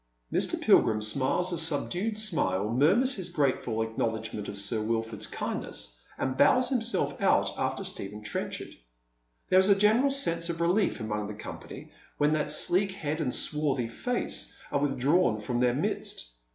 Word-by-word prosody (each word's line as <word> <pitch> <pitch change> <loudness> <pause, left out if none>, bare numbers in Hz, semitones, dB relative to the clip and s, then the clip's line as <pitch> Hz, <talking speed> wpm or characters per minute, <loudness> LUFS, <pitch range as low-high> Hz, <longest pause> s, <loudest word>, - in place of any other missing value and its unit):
IVIr. - - +1
Pilgrim 110 -1 +4
smiles 140 +10 +1
a 170 - -1
subdued 175 +7 0
smile, 110 - 0
murmurs 195 - +4
his 190 -6 -4
grateful 130 -8 0
acknowledgment 110 -1 -3
of 100 - -6
Sir 100 +2 -1
Wilford's 110 -1 -2
kindness, - - -5 0.2
and 130 0 -2
bows 245 - +4
himself 230 -7 -1
out - - +3
after - - -2
Stephen 105 +2 -4
Trenchard. 105 - -4 0.7
There 185 - +6
is 190 +2 +4
a 200 - +7
general 220 +7 +4
sense 170 -12 0
of 170 -1 -3
relief 175 +2 +1
among 105 -1 -3
the 105 - -7
company 105 - -9 0.3
when 150 +1 +2
that 150 -1 0
sleek 185 +5 +2
head 155 -3 -3
and 130 -5 0
swarthy 140 -4 0
face 245 - -3
are - - +1
withdrawn 140 -2 +2
from 120 +3 -2
their 125 0 +2
midst. - - -3
145 Hz, 155 wpm, -28 LUFS, 110-185 Hz, 0.7 s, a